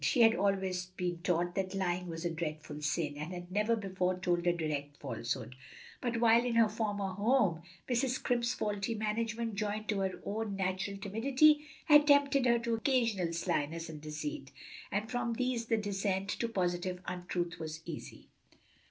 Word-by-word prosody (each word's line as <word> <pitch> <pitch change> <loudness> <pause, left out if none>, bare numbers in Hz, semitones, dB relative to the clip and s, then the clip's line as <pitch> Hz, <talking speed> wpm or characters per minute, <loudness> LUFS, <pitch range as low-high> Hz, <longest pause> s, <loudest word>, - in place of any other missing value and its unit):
She 245 - +3
had 225 0 +7
always 190 -1 0
been 180 -2 -3
taught 175 0 0
that 190 0 -2
lying 180 -1 -1
was 165 0 -5
a 170 - +1
dreadful 155 -2 -5
sin, 150 -1 -1
and 150 +4 -5
had 175 0 -7
never 210 +4 +2
before 185 -3 -1
told 175 -1 0
a - - +6
direct 145 -4 -3
falsehood; 125 -1 -4 0.5
but 240 -2 -1
while 230 0 +5
in 245 -2 -1
her 230 -1 +6
former 205 -2 -1
home, 200 -3 +2 0.3
Mrs. 250 +1 +1
Scrimp's 240 -2 0
faulty 210 +1 -1
management, 225 +1 -1
joined 210 +1 -2
to 210 -2 +1
her 190 -1 -1
own 210 -1 -2
natural 190 +1 -2
timidity, 270 +9 +3 0.2
had 295 -1 +7
tempted 280 -2 +5
her 235 0 +5
to 235 0 -1
occasional 225 -7 +1
slyness 165 -1 -1
and 155 -2 -8
deceit, 155 - -5 0.4
and 210 +2 -2
from 245 -1 -1
these 245 -1 -1
the 225 - +2
descent 195 -1 -1
to 235 - -1
positive 180 -3 -1
untruth 175 -1 -3
was 155 -1 -5
easy. 165 -3 -8
195 Hz, 170 wpm, -33 LUFS, 175-230 Hz, 0.5 s, had